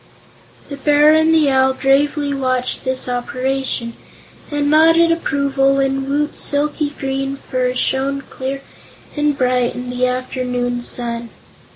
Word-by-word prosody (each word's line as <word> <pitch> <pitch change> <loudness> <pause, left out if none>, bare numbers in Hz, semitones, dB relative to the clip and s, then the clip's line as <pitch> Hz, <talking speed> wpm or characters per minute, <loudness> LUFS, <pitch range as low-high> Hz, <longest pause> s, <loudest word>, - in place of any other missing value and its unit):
The 280 - -6
Bear 295 +2 +4
and 315 +1 +4
the 310 -3 +3
Owl 265 0 +3
gravely 285 +2 +1
watched 255 -2 -1
this 260 0 -1
operation 255 -1 -2 0.6
and 290 -1 -1
nodded 330 +2 +5
approval 275 -4 +1
when 270 0 0
Woot's 295 +1 -1
silky 295 +1 0
green 270 0 -2
fur 255 -2 -2
shone 270 +2 0
clear 270 +1 -6 0.5
and 295 -1 0
bright 250 -2 +1
in 250 0 -5
the 250 0 0
afternoon 250 -1 -2
sun. 235 -1 -3
270 Hz, 130 wpm, -18 LUFS, 255-290 Hz, 0.6 s, nodded